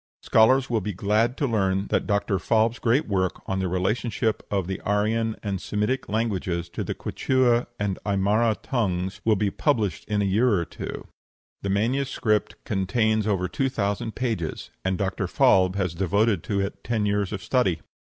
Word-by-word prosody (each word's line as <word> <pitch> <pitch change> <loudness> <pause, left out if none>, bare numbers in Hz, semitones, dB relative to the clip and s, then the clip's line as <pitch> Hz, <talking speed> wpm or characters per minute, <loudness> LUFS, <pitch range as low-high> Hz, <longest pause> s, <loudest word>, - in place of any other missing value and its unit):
Scholars 130 +4 +4
will 115 -3 0
be 105 +2 -3
glad 105 +7 +1
to 145 - 0
learn 95 -5 +1
that - - 0
Dr. 100 -2 +1
Falb's 110 +4 +1
great 125 +6 +2
work 95 -3 -1
on 95 - -2
the 95 - 0
relationship 105 +5 0
of 100 -3 0
the 95 +1 -4
Aryan 110 +2 0
and 100 -3 -2
Semitic 105 +6 -1
languages 95 -6 -1
to - - -4
the - - -4
Quichua 125 -2 +1
and 100 -2 -1
Aimara 105 +3 +2
tongues 95 -6 -1
will 110 -1 +3
be 100 0 0
published 110 - 0
in 105 -1 -1
a 100 - +2
year 110 +4 +3
or 85 -2 0
two; - - -7 0.6
the 100 - -3
manuscript 110 +1 0
contains 110 +2 +1
over 95 -3 +1
two 135 +9 -1
thousand 105 -2 -2
pages, 110 -10 -3
and 95 0 0
Dr. 95 0 -1
Falb 95 0 +4
has 90 -4 -1
devoted 100 +2 +1
to 100 -2 -1
it 100 - -4
ten 110 -3 0
years 100 -1 0
of 100 -3 -5
study. 125 -11 +1
105 Hz, 170 wpm, -25 LUFS, 95-115 Hz, 0.6 s, Scholars